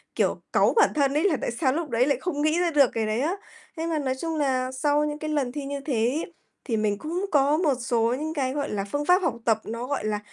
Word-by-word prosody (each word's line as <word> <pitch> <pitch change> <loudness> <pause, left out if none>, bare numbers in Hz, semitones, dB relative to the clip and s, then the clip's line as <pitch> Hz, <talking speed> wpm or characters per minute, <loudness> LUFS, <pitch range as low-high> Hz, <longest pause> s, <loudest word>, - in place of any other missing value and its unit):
kiểu, - - 0
cáu - - +4
bản 445 - +5
thân 280 -2 +2
ấy, 300 +3 +1
là 355 -8 +2
tại - - -1
sao 260 +2 +1
lúc 325 -1 -3
đấy 235 +1 +2
lại 280 -2 +1
không 315 -6 -2
nghĩ 310 +3 +2
ra 350 -1 +1
được 285 -5 +5
cái 225 -1 0
đấy 215 +3 -1
á. 325 +7 0 0.4
Thế 325 - -2
mà 325 -2 0
nói 265 -3 -1
chung 325 -1 -2
nà 260 -3 0
sau 290 +3 +1
những 300 0 -4
cái 310 - -4
lần 285 -5 0
thi 285 +1 -5
như 280 0 -4
thế 275 0 -4
ấy 310 +7 -3 0.3
thì 230 -4 -1
mình 210 -1 0
cũng 340 - -3
có 290 +1 +3
một 315 -4 +2
số 235 -2 +1
những 315 +1 -3
cái, 265 -4 -1
gọi 285 0 -2
là, 200 -1 -2
phương 290 0 -1
pháp 360 +3 +5
học 330 -10 0
tập 225 -2 +3
nó, 230 +2 -5
gọi 280 -5 -2
là, 210 -1 -1
285 Hz, 280 wpm, -25 LUFS, 250-310 Hz, 0.4 s, bản